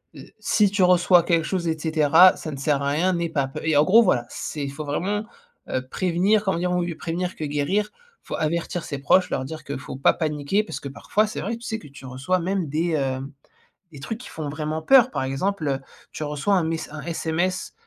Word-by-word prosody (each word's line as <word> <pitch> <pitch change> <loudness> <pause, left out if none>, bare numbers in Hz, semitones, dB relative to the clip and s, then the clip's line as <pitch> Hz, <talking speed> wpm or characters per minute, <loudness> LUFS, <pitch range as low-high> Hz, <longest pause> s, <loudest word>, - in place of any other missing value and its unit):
heu, - - -10 0.2
si 210 -2 +3
tu 200 -2 +2
reçois 180 -1 +5
quelque 165 -2 +1
chose 175 0 -2
et 160 -1 0
cetera, 160 +3 +5
ça 155 - -6
ne 140 - -6
sert 140 +1 0
à 140 - 0
rien, 170 +6 +1
n'aie 170 -1 -1
pas 140 -4 0
p» 135 - -7
et 160 -1 +1
en 145 - +6
gros 220 +9 +6
voilà, 125 - +2
c'est, 150 - -5
il 140 - -3
faut 150 +2 -6
vraiment, 200 +9 -2 0.4
heu, 130 0 -2
prévenir. 185 +6 +1
Comme 190 -2 0
on - - -2
dit, 180 - 0
mieux 180 -1 0
vaut - - -16
prévenir 175 +2 -3
que - - -6
guérir, 150 +9 0 0.3
faut - - -5
avertir 170 +2 -2
ses 140 -3 -5
proches 180 +6 +3
leur 130 - -1
dire 155 +3 -7
que 140 - -5
faut 130 - -8
pas 135 - +3
paniquer 155 +5 0
parce - - -6
que 140 - -6
parfois 210 +9 0
c'est 215 - -5
vrai, 225 +4 -2
tu 235 - -15
sais 225 -1 -3
que 150 - -13
tu 140 -1 -13
reçois 135 +9 -1
même 185 0 -1
des, 160 +4 0
hem, 135 -2 -2 0.6
des 140 - -10
trucs 220 +11 -5
qui 250 - -10
font 155 -2 -5
vraiment 155 +2 -3
peur 255 +7 +6
par - - -2
exemple, 155 +6 -2
heu, 135 -1 0 0.3
tu - - -5
reçois 150 +6 -1
un 180 - +2
mess 160 0 -2
un 155 0 -7
SMS, 170 +3 -2
160 Hz, 240 wpm, -24 LUFS, 145-185 Hz, 0.6 s, en